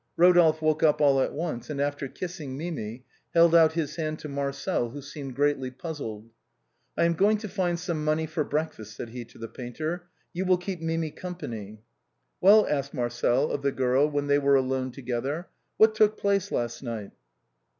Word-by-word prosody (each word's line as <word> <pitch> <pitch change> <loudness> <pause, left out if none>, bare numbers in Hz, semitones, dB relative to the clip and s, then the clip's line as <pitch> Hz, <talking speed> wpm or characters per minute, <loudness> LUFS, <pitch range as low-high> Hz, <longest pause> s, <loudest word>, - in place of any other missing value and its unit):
Rodolphe 165 -3 +5
woke 155 -1 +2
up 155 -2 +4
all 140 -2 +4
at - - 0
once, 155 -6 -4
and 145 -2 -4
after 145 0 -1
kissing 155 -4 -6
Mimi, 130 -7 -5 0.3
held 170 0 +6
out 160 -2 +6
his 160 -2 -2
hand 155 -1 -2
to 155 - -8
Marcel, 140 0 -2
who 140 +5 -8
seemed 140 -2 -8
greatly 145 -2 +1
puzzled. 125 -6 -7 0.3
" - - -46
I - - +3
am 170 0 +3
going 205 +6 +3
to 215 +1 -6
find 180 -3 -1
some 170 -4 -3
money 155 +1 +1
for 155 0 -1
breakfast," 145 -8 -3
said 115 - -6
he 120 +1 -6
to 115 - -18
the 115 - -6
painter. 155 +10 -5
" - - -43
You 185 +2 -2
will 185 -1 +4
keep 180 -1 -5
Mimi 165 -1 -1
company." 110 - -7 0.3
" - - -50
Well," 210 +3 +7
asked 140 -1 -2
Marcel 120 +3 +1
of 140 - -2
the 140 0 +1
girl 130 +3 +2
when 145 -1 -1
they 145 0 +3
were 140 0 +4
alone 130 -1 +1
together, 135 +6 -3
" - - -49
what 220 0 +6
took 215 0 +3
place 200 -1 0
last 120 -1 -2
night 115 -6 -5
150 Hz, 200 wpm, -27 LUFS, 130-170 Hz, 0.3 s, Well